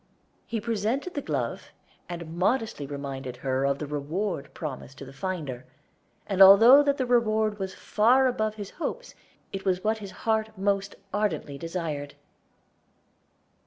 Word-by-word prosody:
He 230 - -2
presented 230 - -2
the 285 - -2
glove, 135 - -3 0.4
and 170 -2 -6
modestly 205 - 0
reminded 135 -3 -6
her 130 0 +1
of 140 0 +1
the 150 - -4
reward 150 +1 -3
promised 135 -3 -6
to 140 - -8
the 135 - -12
finder, 145 -5 -4 0.6
and 195 -1 0
although 225 +8 +10
that 285 0 +1
reward 220 -3 +2
was 190 -1 -4
far 245 +5 +3
above 215 -4 0
his 205 -2 -7
hopes, - - -5 0.4
it 195 0 -4
was 185 -1 0
what 220 +1 +1
his 200 -2 -7 0.2
heart 220 -1 0
most 195 0 0 0.2
ardently 205 -9 -1
desired. 160 -4 -4
195 Hz, 140 wpm, -27 LUFS, 145-220 Hz, 0.6 s, although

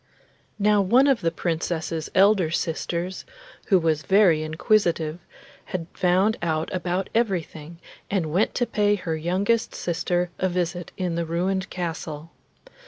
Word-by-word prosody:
Now 210 0 +3
one 240 +8 +4
of 275 -4 +3
the 165 - +2
Princess's 165 -1 -3
elder 195 -3 +5
sisters, 170 +2 -3 0.4
who 195 - +5
was 160 -3 +1
very 190 -2 +4
inquisitive, 165 -1 +1 0.5
had 175 -3 -4
found 190 +4 +2
out 160 -2 -1
about 185 +1 -2
everything, 170 -7 -2 0.3
and 165 -6 -1
went 195 +5 +1
to 245 - +1
pay 205 -2 +2
her 170 -5 -3
youngest 190 +8 0
sister 175 +1 -1
a 185 - +1
visit 175 0 -2
in 180 -3 -1
the 170 0 -1
ruined 190 +3 -1
castle. 165 -3 -5
175 Hz, 135 wpm, -24 LUFS, 165-195 Hz, 0.5 s, elder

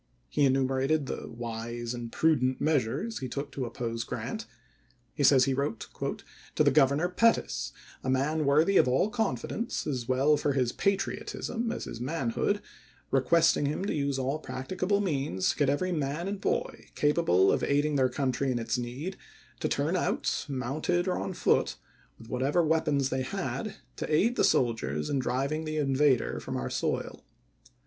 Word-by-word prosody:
He 140 - +2
enumerates 135 +2 +2
the - - -5
wise 120 0 -5
and 120 -1 -6
prudent 130 -5 +2
measures 155 - 0
he 130 -2 -4
took 140 +3 -4
to 135 -2 -3
oppose 115 -1 -3
Grant. - - -5 0.7
He 145 - -1
says 130 -2 +6
he 135 - +1
wrote 140 -4 -2 0.7
"to - - +4
the 145 - +4
Governor, 140 +3 +4
Pettus, 230 +6 +1 0.2
— - - -22
a 130 - -2
man 145 +4 +1
worthy 155 +8 +4
of - - +5
all 135 +12 +2
confidence, 225 - -2
as 125 -5 -3
well 135 +4 +3
for 145 - 0
his 125 -3 +1
patriotism 210 - -1
as 240 - -4
his 115 - -7
man 135 -2 -1
hood,— - - 0 0.5
requesting 145 +2 +3
him 155 +6 -2
to - - -1
use 140 -2 0
all 135 +3 -1
practicable 180 +10 -1
means 140 - 0
to - - -8
get 145 -2 +3
every 180 +6 0
man 150 +2 -2
and 200 0 -4
boy, - - -2
capable 145 - +3
of - - 0
aiding 145 +1 +2
their 130 -2 +3
country 135 +1 0
in 125 - 0
its 115 +1 -1
need, 130 +11 -5 0.4
to - - 0
turn - - 0
out, - - -1
mounted 145 +7 -1
or 185 - 0
on 190 - -3
foot, - - +2 0.4
with 115 - -13
whatever 135 +8 +1
weapons 150 -4 +2
they 130 -1 -1
had, 200 - -3 0.2
to - - -4
aid 215 +11 +3
the - - +2
soldiers 95 - +1
in 140 - +1
driving 135 +5 -1
the 155 0 -3
in 135 -3 +1
vader 135 -3 +2
from - - -4
our 65 0 -3
soil. - - -2
140 Hz, 175 wpm, -29 LUFS, 130-160 Hz, 0.7 s, says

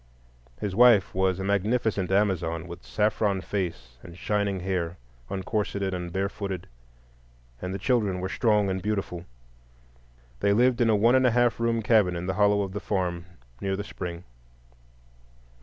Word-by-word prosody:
His 100 -2 -3
wife 120 -4 +5
was 95 -1 +1
a - - -3
magnificent 100 -1 0
Amazon, 90 -5 0
with 85 0 -9
saffron 105 -2 0
face 80 -12 -4
and 85 0 -12
shining 100 -2 -1
hair, 90 -2 -2 0.3
uncorseted 100 0 -2
and 90 -1 -4
barefooted, 95 -1 -3 1.0
and 90 - -4
the 95 - -3
children 105 -3 +1
were 95 - -2
strong 105 0 +2
and 95 0 -2
beautiful. 95 -4 -3 1.1
They 100 - +3
lived 120 +2 +3
in 115 - +4
a 110 - +4
one 115 +4 +4
and 130 -1 +5
a - - +5
half 120 0 +2
room 115 -1 0
cabin 105 -5 +3
in 85 +1 -4
the 95 - -1
hollow 100 +1 +3
of 95 -1 -6
the 105 - -3
farm, 90 -4 -2 0.4
near 95 0 -1
the 100 - -4
spring. 90 -4 -6
100 Hz, 155 wpm, -26 LUFS, 90-105 Hz, 1.1 s, wife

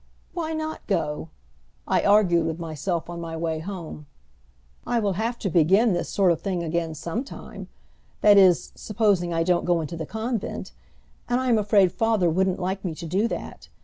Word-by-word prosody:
"Why 320 -2 -3
not 315 0 -5
go?" 155 -5 -1 0.6
I - - +2
argued 185 -5 +4
with 160 0 -3
myself 165 +1 -3
on 170 0 -6
my 165 -1 -5
way 160 -1 -2
home. 165 -4 -7 0.8
"I 240 0 0
will 205 -3 0
have 225 +5 -2
to 215 - -3
begin 190 +6 +4
this 175 - -2
sort 190 -3 +3
of 165 - -1
thing 185 -4 -2
again 165 -1 -2
sometime 170 - -6 0.5
that 210 -1 +7
is, 185 -4 +5
supposing 200 -5 0
I 165 0 +1
don't 175 0 +2
go 175 -1 +2
into 160 +1 -4
the 160 - -5
convent, 220 0 -4 0.6
and 245 +1 +2
I 260 0 -1
am 230 -2 +4
afraid 200 -3 +4
father 220 -7 +1
wouldn't 185 +2 +1
like 190 +1 -3
me 170 -4 -3
to 170 - -8
do 190 +7 +1
that. - - -7
185 Hz, 180 wpm, -24 LUFS, 165-215 Hz, 0.8 s, that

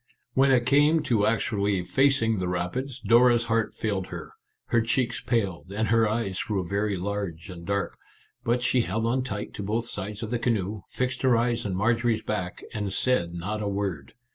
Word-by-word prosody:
When 135 +1 +4
it 125 -2 +4
came 145 +4 +4
to 115 -8 +2
actually 105 -4 +1
facing 115 -1 +2
the 90 - -1
rapids, 115 +10 -3
Dora's 120 +1 +5
heart 115 -1 0
failed 100 -4 -2
her; - - -8 0.4
her 115 - +3
cheeks 120 +1 0
paled, 100 -6 -1
and 110 +1 -1
her 115 -1 +4
eyes 105 -4 -1
grew 95 -5 -2
very 100 +1 0
large 95 -2 -4
and 85 -2 -10
dark; 100 0 -2 0.4
but 120 +1 +1
she 125 0 +3
held 110 +2 -1
on 125 +3 +1
tight 105 -4 -5
to - - -6
both 110 +4 -1
sides 105 0 -4
of 110 - -5
the 120 - 0
canoe, 105 -4 -1
fixed 125 0 -2
her 130 -3 +4
eyes 120 -1 0
on 95 - -2
Marjorie's 115 +2 +1
back, 90 -4 -3
and 105 -3 -2
said 95 -6 +1
not 105 +5 -3
a 105 - -1
word. 100 -8 -3
110 Hz, 190 wpm, -26 LUFS, 100-120 Hz, 0.4 s, Dora's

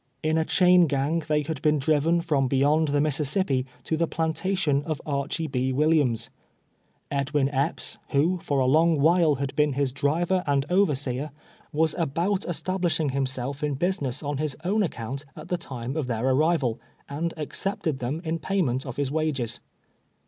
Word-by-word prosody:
In 155 +1 +1
a 160 - +2
chain 180 -1 +5
gang 145 +4 0
they 150 -1 +1
had 150 -2 -5
been 150 0 +3
driven 155 +4 +2
from 145 -6 +1
beyond 145 +4 +2
the 145 0 +1
Mississippi 145 -1 +1 0.2
to 160 - -1
the 170 +1 +1
plan 160 0 -1
tation 175 -7 0
of 155 -1 -3
Archy 145 +3 -1
B, 130 -3 -1
AVilliams, 135 -5 +2 0.8
Edwin 140 0 +1
Ej^ps, 140 0 -1
who, 165 +6 +2
for 145 -3 -2
a 130 - +2
long 160 +4 +4
%vliile 160 0 +4
had 140 0 -4
been 150 -1 +2
his 140 -1 0
driver 165 +7 0
and 140 -1 +2
overseer, 145 -7 +1 0.4
was 160 +1 +1
about 170 +6 0
establishing 175 -1 0
himself 135 +1 -3
in 145 -2 0
business 145 -4 -2
on 145 -1 -2
his 155 -3 -2
own 210 +4 +2
ac 190 - +1
count, 125 +5 -5
at 155 - -10
the 180 - +1
time 130 -4 -6
of 155 -5 -2
their 115 0 -2
arrival, 135 -3 +2 0.3
and 165 +4 -3
accepted 155 -1 -2
them 140 +8 -3
in 165 0 -2
payment 145 -8 -1
of 125 - -5
his 140 -2 -1
wages. 140 -7 -1
150 Hz, 170 wpm, -26 LUFS, 135-165 Hz, 0.8 s, chain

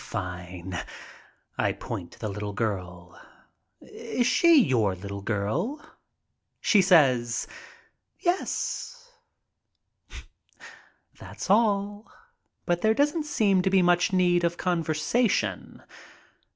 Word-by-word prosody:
"Fine." 90 0 -6 0.8
I - - +1
point 85 -2 -7
to - - -17
the 110 - -4
little 105 0 -5
girl. 90 -4 -5 0.6
"Is 245 - -3
she 330 +5 +5
your 115 - +2
little 100 +2 -7
girl?" 110 - -2 0.8
She 205 - +4
says, 130 -11 +3 0.7
"Yes." 470 +6 -3 2.1
That's - - -5
all, 205 -1 +1 0.5
but 175 0 0
there 220 0 +3
doesn't 295 +3 0
seem 200 -9 +2
to 190 - +1
be 190 -1 +3
much 175 +1 +3
need 175 -2 +2
of 170 0 0
con 175 -2 -1
versation. 160 +10 -1
175 Hz, 100 wpm, -26 LUFS, -, 2.1 s, she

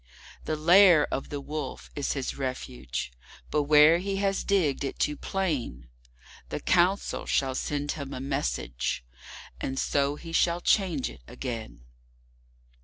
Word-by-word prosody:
The 155 - -1
Lair 170 +1 +6
of 135 - -3
the 145 - -4
Wolf 150 +2 -6
is 145 - -1
his 135 -2 -3
refuge, 65 - -4 0.4
but 150 -1 +1
where 150 +3 +7
he 195 +2 -2
has 195 0 0
digged 170 -10 +1
it 135 - -4
too 150 - 0
plain, 140 - -3 0.6
The - - -3
Council 185 +2 +1
shall 135 -1 +1
send 145 +2 -2
him 140 -3 -6
a - - -5
message, 130 - -2 0.5
and 135 - -3
so 140 +1 +1
he 165 +2 -9
shall 170 +1 +2
change 175 - +1
it - - -15
again. 115 - -6
145 Hz, 140 wpm, -27 LUFS, 135-170 Hz, 0.6 s, where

